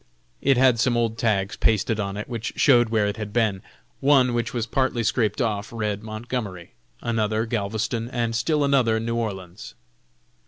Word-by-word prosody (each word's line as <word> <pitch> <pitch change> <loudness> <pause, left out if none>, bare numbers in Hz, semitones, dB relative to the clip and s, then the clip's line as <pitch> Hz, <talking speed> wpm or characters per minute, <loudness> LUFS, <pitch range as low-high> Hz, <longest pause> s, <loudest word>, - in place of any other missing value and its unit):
It 135 -2 +3
had 125 -2 +4
some 120 0 +2
old 115 -1 -1
tags 100 -4 0
pasted 110 0 +1
on 100 -1 -3
it, 105 - -5
which 115 -2 -4
showed 120 -4 +4
where 110 -2 +2
it 105 +1 -2
had 105 -2 -5
been. 105 -4 +1 0.4
One 135 -3 +4
which 120 0 -1
was 120 -3 -2
partly 130 -2 0
scraped 110 -2 0
off, 105 -4 -1
read 105 -3 -2
Montgomery, 110 -4 -5 0.3
another 110 -1 0
Galveston, 110 +1 -2
and 120 -2 -2
still 145 +6 +1
another 130 -6 +3
New 115 +1 -2
Orleans. 95 -5 -5
115 Hz, 165 wpm, -24 LUFS, 105-120 Hz, 0.4 s, had